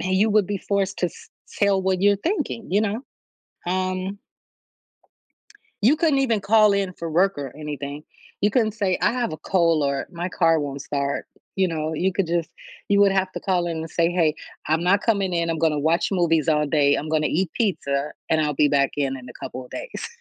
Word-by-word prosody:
you 190 +4 +2
would 210 -3 +3
be 205 -1 -2
forced 200 0 -1
to 180 - +2
s - - -11 0.3
tell 200 -2 +3
what 185 -1 0
you're 205 0 +5
thinking, 285 - -2
you 200 - +3
know. 215 +1 -1 0.7
Um 185 +2 -2 1.6
You 270 +8 +5
couldn't 310 -4 +2
even 235 -6 +1
call 215 0 +5
in 195 -2 0
for 170 -2 -6
work 185 +1 +2
or 135 -2 -6
anything. 145 -1 -6 0.4
You 205 - +4
couldn't 220 -1 +2
say, 200 -4 0
I - - +3
have 245 -7 -2
a - - -4
cold 165 -3 +2
or 140 0 -1
my 175 +1 -4
car 165 -3 +2
won't 140 -1 -4
start, 140 -1 -2 0.3
you 190 -1 +2
know, 155 -1 -2
you 185 +4 0
could 190 -2 0
just, 170 -1 -1 0.4
you 200 0 +4
would 200 -1 +5
have 190 -1 0
to - - -5
call 180 -2 0
in 165 -1 -3
and 160 0 -6
say, 170 0 +1
hey, 165 -4 +2 0.3
I'm 160 +2 +2
not 195 +3 +3
coming 200 -5 +1
in, 170 -1 0
I'm 165 - -2
gonna 160 -1 +2
to - - -1
watch 160 +4 +1
movies 165 -4 +2
all 150 -1 +3
day. 145 -1 +3
I'm 155 - -4
gonna 155 -1 +1
eat 180 +1 0
pizza 150 -10 -1 0.2
and 160 -1 +2
I'll 150 -2 0
be 145 +1 +3
back 140 -1 +2
in 135 -2 -1
in 125 -1 -11
a - - -9
couple 130 - -6
of 125 - -17
days. - - -6
175 Hz, 215 wpm, -23 LUFS, 155-200 Hz, 1.6 s, you're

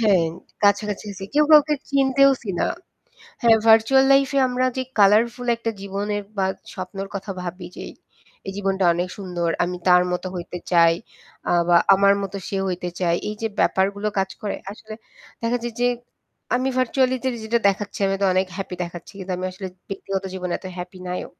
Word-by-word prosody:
হ্যাঁ, 195 -7 +4 0.4
কাছাকাছি 205 0 +2
আছি 195 0 -8
কেউ 300 +1 +5
কাউকে 300 0 +7 0.2
চিনতেওছি 270 -3 +3
না। - - +2 0.8
হ্যাঁ, 230 -1 +6
ভার্চুয়াল 225 +4 +6
লাইফে 275 +1 +3
আমরা 250 +1 0
যে 260 - 0 0.2
কালারফুল 225 +5 +4
একটা 230 0 -3
জীবনের 205 +1 -3 0.2
বা 190 - +2 0.3
স্বপ্নের 195 +1 -6
কথা 195 +1 -5
ভাবি 180 +1 -6
যে - - -7 0.6
এই 195 - -4
জীবনটা 195 -1 0
অনেক 175 +1 -1
সুন্দর, 175 -3 -2
আমি 180 +1 -3
তার 180 0 +7
মতো 180 +1 -3
হইতে 180 0 -6
চাই 170 -1 +6 0.5
আ - - +1 0.2
বা 175 - +6 0.2
আমার 200 +1 +5
মতো 195 0 -5
সে 195 - -3
হইতে 180 -1 -3
চায়, 170 -2 +2
এইযে 215 +1 -3
ব্যাপারগুলো 200 +2 +1
কাজ 190 0 0
করে। 205 - -2 0.2
আসলে 215 +1 -10 0.5
দেখা 230 +1 +1
যায় 240 0 -4
যে 245 - +3 0.7
আমি 255 +1 +1
ভার্চুয়ালিটি 255 0 +1 0.2
যেটা 230 +2 +1
দেখাচ্ছি 200 +1 -3
আমি 195 0 0
তো - - +4
অনেক 185 +1 +2
হ্যাপি 195 -2 -5
দেখাচ্ছি, 170 0 -10
কিন্তু 190 -1 -5
আমি 185 +1 -3
আসলে 190 +1 -7 0.2
ব্যক্তিগত 195 0 -4
জীবনে 180 -1 -3
এত - - -10
হ্যাপি 180 +1 -7
নাইও। 180 - -4
200 Hz, 170 wpm, -22 LUFS, 185-230 Hz, 0.8 s, কাউকে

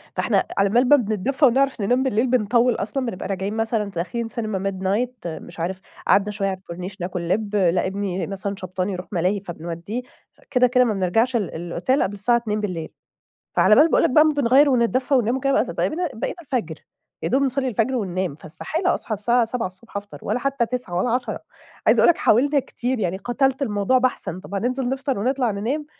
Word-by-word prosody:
فإحنا - - +2
على 195 0 +3
بال 245 +4 +3
ما 290 - +9
بنتدفى 245 +4 +1
ونعرف 270 -1 +2
ننام 245 +6 +2
بالليل 250 -1 +1
بنطول 240 0 +2
أصلًا، 255 +6 -2
بنبقى 185 -6 -4
راجعين 195 +1 -3
مثلًا 225 -1 0
داخلين 195 +7 -3
سينما 210 -4 -2
midnight 200 +5 -2
مش 165 +1 -8
عارف 185 +3 -2 0.3
قعدنا 205 +1 +3
شويّة 200 -1 -2
على 190 - -3
الكورنيش 185 +1 -8
ناكل 180 0 -3
لب، 210 +1 0
لأ، 185 -1 +2
إبني 195 -1 -3
مثلًا 200 +1 -4
شبطان 185 0 -3
يروح 185 -1 -5
ملاهي 185 +2 +1
فبنوديه. 175 +5 -5 0.5
كده، 250 -2 +4
كده، 250 0 +4
ما 220 - +1
بنرجعش 225 +6 +1
ال 205 -7 -1
الأوتيل، 175 - 0
قبل 195 - -2
الساعة 225 +4 +2
02:00 210 -7 -3 0.7
فعلى 215 - +6
بال 300 +7 +6
باقول - - +3
لك - - +3
بقى 305 +4 +6
ما 310 - +3
بنغير 280 +1 +5
ونتدفى 255 +2 +2
وننام 245 -1 +2
وكده 275 +1 +2
بتت - - -5
بقينا 350 +2 0
بقينا 225 - -4
الفجر 230 - -4 0.4
يا 165 - 0
دوب 265 +9 +2
نصلي 270 0 0
الفجر 235 +2 0
وننام، 185 - -2
فاستحالة 315 - -2
أصحى 220 - -3
الساعة 235 +4 +2
07:00 225 -5 -4
الصبح - - -4
أفطر 200 0 -6
ولا - - -1
حتّى 275 -2 0
21:00 245 -7 -4
ولا 235 +6 +1
22:00. 245 -2 -1 0.5
عايزة - - +5
أقول - - +6
لك 340 - +1
حاولنا 280 +6 +3
كتير 250 0 -3
يعني 185 -3 -1
قتلت 265 +6 0
الموضوع 210 +1 +2
بحثًا. 250 -8 -1
طب 200 - -8
هننزل 250 +5 -1
نفطر 270 -2 -2
ونطلع 250 +1 +1
ننام؟ 250 +10 -2
225 Hz, 195 wpm, -22 LUFS, 190-255 Hz, 0.7 s, ما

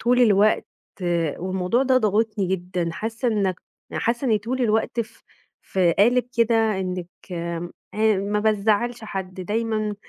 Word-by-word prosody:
طول 245 +2 +3
الوقت 215 -2 +4 0.7
والموضوع 185 +6 0
ده 260 -1 +3
ضاغطني 215 -2 +1
جدًا، 180 -2 -2
حاسّة 225 +6 -2
إنك 200 -5 0 0.3
حاسة 235 +3 -1
إني 220 -5 +3
طول 245 +5 -3
الوقت 225 +1 +1
ف 225 0 -8 0.4
في 180 -3 +2
قالب 245 +7 +4
كده 225 -3 +3
إنك 180 -2 -3 0.3
آمم، 170 0 -4 0.6
ما 210 - +2
بازعّلش 220 +2 +1
حد، 190 -3 -5
دايمًا 215 +2 -1
215 Hz, 130 wpm, -23 LUFS, 185-230 Hz, 0.7 s, الوقت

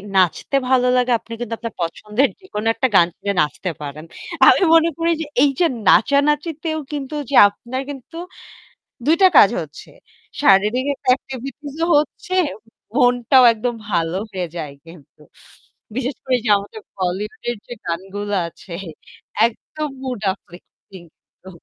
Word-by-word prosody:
নাচতে 185 - +1
ভালো 250 -1 +3
লাগে 250 0 +1
আপনি 230 - -11
কিন্তু 235 -1 -4
আপনার 230 -3 -6
পছন্দের 210 +10 0
যেকোনো 225 - -5
একটা 260 - +1
গান 170 - +6
শুনে 200 - -2
নাচতে 150 +5 -2
পারেন। 150 +2 -7 0.4
আমি - - +6
মনে 330 0 +5
করি 335 0 +1
যে - - -3 0.2
এই 290 - +5
যে 350 - +4 0.2
নাচানাচিতেও 300 +4 +2
কিন্তু 285 0 -5 0.2
যে 280 - -1
আপনার 240 +6 -6
কিন্তু 280 +3 -9 0.9
২ 320 - +4
টা 375 - +9
কাজ 200 - +8
হচ্ছে, 150 -1 -12 0.5
শারীরিক 210 +4 +4
একটা 255 - -11
activities 270 +2 -8
ও - - -1
হচ্ছে, 305 +4 -3 0.6
মনটাও 245 0 +4
একদম 235 +2 -3 0.2
ভালো 170 -1 0
হয়ে 185 -3 -3
যায় 150 -4 -5
কিন্তু। 160 -3 -16 0.7
বিশেষ 260 0 -2
করে 260 -1 +2
যে - - -2
আমাদের 205 +2 -10 0.2
Bollywood 190 +3 -3
এর 240 - -3
যে - - -7
গানগুলো 195 +4 -4
আছে 175 - -14 0.7
একদম 300 +6 -6
mood 250 -5 -4
uplifting 180 0 -16 0.4
কিন্তু। 190 - -12
235 Hz, 145 wpm, -20 LUFS, 190-275 Hz, 0.9 s, টা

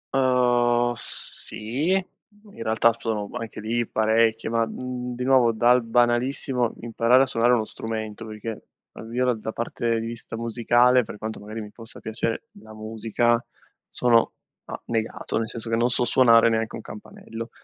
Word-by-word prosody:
Uhm, 120 -2 +3
sì, 120 +5 -5
in 205 +3 -8
realtà 115 +1 +3
sono 105 -3 -2
anche 115 -2 -7
lì 115 +2 -1
parecchio, 110 +1 +2
ma, 115 0 +2
mhmm, 125 +1 -5
di 125 - -4
nuovo 130 -3 +4
dal 120 +2 +4
banalissimo 120 +1 +1
imparare 120 +3 +3
a - - +2
suonare 120 -2 +2
uno 115 -3 +2
strumento, 110 0 -5
perché 110 0 -7 0.3
almeno 125 +2 -1
da 110 0 -5
parte 115 0 -1
di 115 - -4
vista 115 -1 -6
musicale, 120 +2 +3
per 105 - -9
quanto 110 +1 -5
magari 110 +2 -7
mi 105 -1 -9
possa 115 -1 -10
piacere 115 - -3
la 110 - -13
musica, 115 +2 0 0.5
sono, 120 -2 +3 0.3
a - - -7
negato 115 -1 -2
nel 110 -1 -3
senso 115 -1 -8
che 115 - +1
non 120 +2 +2
so 125 0 +1
suonare 115 -3 +6
neanche 110 -1 0
un - - -8
campanello 115 +2 -9
115 Hz, 155 wpm, -24 LUFS, 110-125 Hz, 0.5 s, suonare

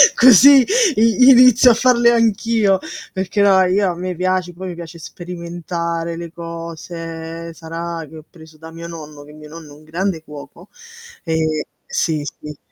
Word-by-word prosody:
Così, 260 +3 +7 0.3
i 230 +4 +4
inizio 250 -1 +6
a - - +4
farle 240 0 +3
anch'io, 225 -3 +1 0.3
perché 190 +2 -2
no 195 -2 +4
io 185 0 +1
a - - -7
me 180 +1 -5
piace, 185 0 -2
poi 185 +2 -8
mi 175 - -7
piace 170 0 -10
sperimentare 170 0 -6
le 170 -1 -8
cose, 165 0 -8
sarà 165 +1 -7
che 160 - -12
ho 155 - -14
preso 160 -2 -17
da 160 +1 -12
mio 165 +1 -9
nonno, 155 -3 -11
che 150 - -15
mio 150 0 -14
nonno 160 -2 -12
è - - -17
un 155 - -19
grande 165 +1 -4
cuoco, 150 +5 -13 0.5
e 160 -2 -2 0.2
sì, 155 -3 -2 0.2
sì. 150 -1 -10
170 Hz, 165 wpm, -18 LUFS, 160-190 Hz, 0.5 s, Così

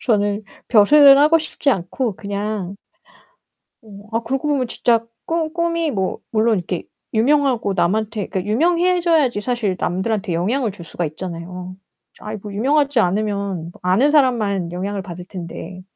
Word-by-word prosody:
저는 205 -3 +1 0.3
벼슬을 275 +6 +7
하고 305 +3 +5
싶지 305 -2 -1
않고 200 +2 -2
그냥 200 -1 -4 1.1
어 220 - -18 0.3
아 230 - +1
그러고 270 +5 -2
보면 265 -4 0
진짜 230 -1 +1 0.2
꿈 325 -1 -1
꿈이 335 -2 0
뭐 190 -5 -2
물론 220 0 +2
이렇게 180 0 -4 0.3
유명하고 245 -3 +2
남한테 210 +4 0
그니까 190 +2 -3
유명해져야지 335 - +2
사실 215 -5 -1
남들한테 190 +1 -1
영향을 220 +7 0
줄 180 -3 -10
수가 175 - -4
있잖아요. 180 +3 -6 0.4
아이 215 +1 -6
뭐 210 - -7
유명하지 275 +4 +2
않으면 200 -3 -1
아는 190 +11 +3
사람만 215 - +2
영향을 195 +2 -3
받을 180 -2 -8
텐데. 180 0 -8
215 Hz, 320 characters per minute, -20 LUFS, 185-270 Hz, 1.1 s, 벼슬을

